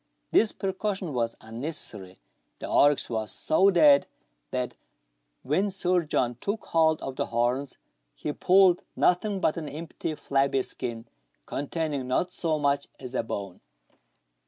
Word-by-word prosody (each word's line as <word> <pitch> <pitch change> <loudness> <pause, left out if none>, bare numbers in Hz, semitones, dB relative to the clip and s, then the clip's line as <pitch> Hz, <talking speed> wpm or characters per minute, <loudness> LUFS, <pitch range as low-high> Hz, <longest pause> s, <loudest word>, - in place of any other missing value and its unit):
This 220 - +4
precaution 190 -3 -3
was 115 -2 -1
unnecessary; 110 - -6 0.4
the - - -6
oryx 145 0 +4
was 110 -3 -2
so 190 - +3
dead, 150 -6 +6 0.4
that - - -2 0.7
when 185 +9 +1
Sir 185 -2 +1
John 125 -5 0
took 210 +2 -3
hold 160 -1 +3
of 135 -1 -5
the - - -1
horns, 125 +4 -1 0.4
he 150 - -4
pulled 185 0 +5
nothing 195 +3 +2
but 160 - +1
an 155 -3 -4
empty 155 +1 -5
flabby 135 -2 +1
skin, 120 -2 -5 0.4
contain 155 +2 -3
ing 135 -3 -3
not 175 +8 0
so 160 -3 0
much 140 -1 +1
as 125 -1 -7
a - - +1
bone. 100 -5 -6
145 Hz, 140 wpm, -27 LUFS, 125-180 Hz, 0.7 s, dead